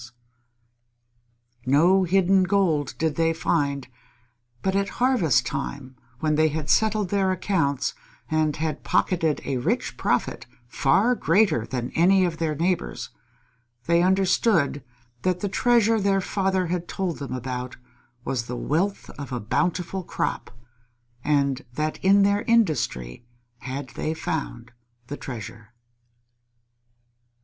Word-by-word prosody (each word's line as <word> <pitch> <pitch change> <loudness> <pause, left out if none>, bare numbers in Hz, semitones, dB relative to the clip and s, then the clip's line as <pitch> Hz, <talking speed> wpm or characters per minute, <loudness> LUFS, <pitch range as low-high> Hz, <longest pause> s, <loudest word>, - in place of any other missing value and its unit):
No 175 +8 +4
hidden 190 +1 +3
gold 175 -8 +1
did 160 -2 -1
they 165 0 +2
find; 140 -5 -1 0.8
but 190 0 0
at 200 0 +1
harvest 240 - +3
time 130 - -5 0.3
when 155 -1 +1
they 155 +1 +4
had 155 -1 -2
settled 215 -3 +2
their 195 -1 +1
accounts 155 -8 0 0.3
and 155 -1 +1
had 155 -1 -3
pocketed 165 -4 +1
a 135 - -1
rich 125 - -1
profit - - -1 0.2
far 190 - +2
greater 165 - +2
than 125 -2 -3
that - - -19
of 165 - +3
any 190 +1 +5
of 170 -2 -3
their 160 -2 -1
neighbors, 175 +4 -2 0.7
they 170 0 +3
understood 185 - +2 0.4
that 180 -1 0
the 205 - 0
treasure 225 +1 +3
their 195 0 +2
father 190 -1 0
had 175 0 -3
told 185 -4 -3
them 140 -2 -5
about 125 0 -5 0.5
was 120 -3 -2
the 125 - -4
wealth 185 +10 -1
of 140 -1 -7
a 125 - -2
bountiful 180 - -1
crop, - - -3 0.7
and 140 -2 +1
that 155 +3 -3
in 200 +1 +5
their 200 +1 +2
industry 145 - +1 0.4
had 135 0 -6
they 155 - -3
found 130 -7 -4 0.3
the 145 - -6
treasure. 115 -2 -9
165 Hz, 130 wpm, -24 LUFS, 140-190 Hz, 0.8 s, any